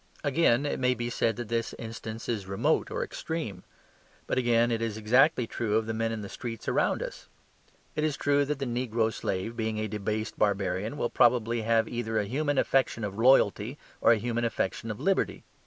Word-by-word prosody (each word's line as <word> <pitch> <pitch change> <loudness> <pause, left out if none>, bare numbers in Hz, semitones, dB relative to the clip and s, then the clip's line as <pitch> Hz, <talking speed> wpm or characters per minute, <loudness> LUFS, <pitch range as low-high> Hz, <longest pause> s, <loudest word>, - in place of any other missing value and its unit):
Again, 145 -3 +3
it 145 - -1
may 125 0 +2
be 120 +1 -3
said 115 -1 +1
that 120 -2 -5
this 115 0 -1
instance 115 -1 -7
is 105 -5 -2
remote 95 0 +1
or - - -2
extreme. 160 -12 -5 0.6
But, - - 0
again, 120 -1 +3
it 115 -1 0
is 115 -2 -2
exactly 125 +5 +4
true 110 -1 -1
of 110 - 0
the 110 - -3
men 115 0 -1
in 110 -1 -4
the - - -5
streets 115 +1 -7
around - - +1
us. - - -8 0.7
It 150 - 0
is 155 -3 0
true 145 0 +2
that 150 0 -2
the 140 - -3
negro 120 -2 0
slave, 95 +5 -3
being 110 -1 -2
a 110 - -1
debased 105 +1 -3
barbarian, 100 +4 0
will 120 - -1
probably 120 -2 +3
have 115 0 +2
either 110 -2 -2
a 105 - +1
human 145 +6 -1
affection 130 -4 +2
of 100 +1 -4
loyalty, 120 0 +4 0.2
or - - +6
a 115 - +5
human 120 +2 -2
affection 115 -1 -2
for 105 - -2
liberty. 195 0 0
115 Hz, 200 wpm, -28 LUFS, 110-125 Hz, 0.7 s, or